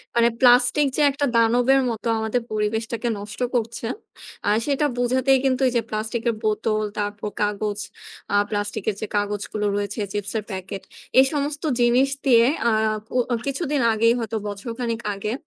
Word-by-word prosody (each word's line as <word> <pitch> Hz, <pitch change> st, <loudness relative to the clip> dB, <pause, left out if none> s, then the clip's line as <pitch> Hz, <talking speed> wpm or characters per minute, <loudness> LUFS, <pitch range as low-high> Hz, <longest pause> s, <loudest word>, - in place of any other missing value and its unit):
মানে 235 Hz, 0 st, +5 dB
plastic 250 Hz, +3 st, +5 dB
যে -, -, +2 dB
একটা 285 Hz, +1 st, -1 dB
দানবের 245 Hz, +4 st, +4 dB
মতো 230 Hz, 0 st, -4 dB
আমাদের 220 Hz, +3 st, -1 dB
পরিবেশটাকে 220 Hz, +2 st, -1 dB
নষ্ট 205 Hz, +2 st, -8 dB, 0.2 s
করছে। 230 Hz, 0 st, -2 dB, 0.6 s
আ -, -, +4 dB, 0.2 s
সেটা 290 Hz, +1 st, +1 dB
বোঝাতেই 260 Hz, +2 st, +3 dB
কিন্তু 260 Hz, 0 st, +1 dB
এই 250 Hz, -, -1 dB
যে -, -, +2 dB
plastic 220 Hz, +2 st, -2 dB
এর 230 Hz, -, -1 dB
বোতল, 215 Hz, 0 st, 0 dB, 0.2 s
তারপর 205 Hz, 0 st, -3 dB
কাগজ, 210 Hz, 0 st, -1 dB, 0.6 s
আ -, -, +3 dB
plastic 205 Hz, -1 st, -2 dB
এর 210 Hz, -, -2 dB
যে 215 Hz, -, -3 dB
কাগজগুলো 205 Hz, +1 st, -2 dB
রয়েছে, 205 Hz, +2 st, -3 dB
চিপসের 205 Hz, +1 st, -2 dB
packet। 190 Hz, +1 st, -6 dB, 0.4 s
এই 265 Hz, -, +8 dB
সমস্ত 290 Hz, 0 st, -2 dB, 0.2 s
জিনিস 245 Hz, +3 st, +4 dB, 0.2 s
দিয়ে 235 Hz, -3 st, +6 dB, 0.2 s
অ্যা 235 Hz, -1 st, +3 dB, 0.4 s
ও -, -, +4 dB
কো 240 Hz, -, +1 dB
কিছুদিন 280 Hz, 0 st, -1 dB
আগেই 230 Hz, +1 st, +3 dB
হয়তো 225 Hz, -1 st, -3 dB
বছর 205 Hz, +3 st, -6 dB
খানিক 230 Hz, -2 st, -2 dB
আগে 210 Hz, +3 st, -3 dB
230 Hz, 165 wpm, -23 LUFS, 210-250 Hz, 0.6 s, এই